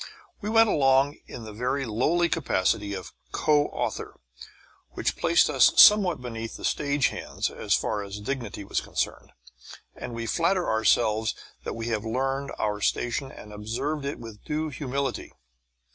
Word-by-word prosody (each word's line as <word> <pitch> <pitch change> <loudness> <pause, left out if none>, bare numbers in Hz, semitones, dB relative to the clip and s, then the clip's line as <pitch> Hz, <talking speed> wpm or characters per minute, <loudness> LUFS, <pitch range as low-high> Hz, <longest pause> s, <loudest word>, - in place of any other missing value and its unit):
We 210 - -3
went 225 0 +5
along 135 -3 +3
in 120 - -8
the 110 -1 -8
very 130 +5 -1
lowly 150 +10 +2
capacity 105 - 0
of 95 -2 -8 0.2
co 150 -1 +3
author, - - -4 0.7
which - - -1
placed - - +4
us - - +5
somewhat 205 -4 +8
beneath 115 -2 -5
the - - -6
stage 145 -1 +1
hands - - -4
as - - 0
far 105 - -1
as 100 0 -7
dignity 115 -3 -4
was 100 - -1
concerned; - - -3 0.6
and 120 - -7
we 115 0 -4
flatter 175 +7 +1
ourself 110 0 +2 0.3
that - - -3
we 115 0 -4
have 110 -2 -1
learned 135 +4 -2
our 105 -1 -1
station 120 +5 -1
and 105 - -11
observe 125 +8 -3
it 140 +1 -3
with 110 -3 -11
due 155 +1 -2
humility. 135 -1 -3
125 Hz, 155 wpm, -26 LUFS, 110-145 Hz, 0.7 s, somewhat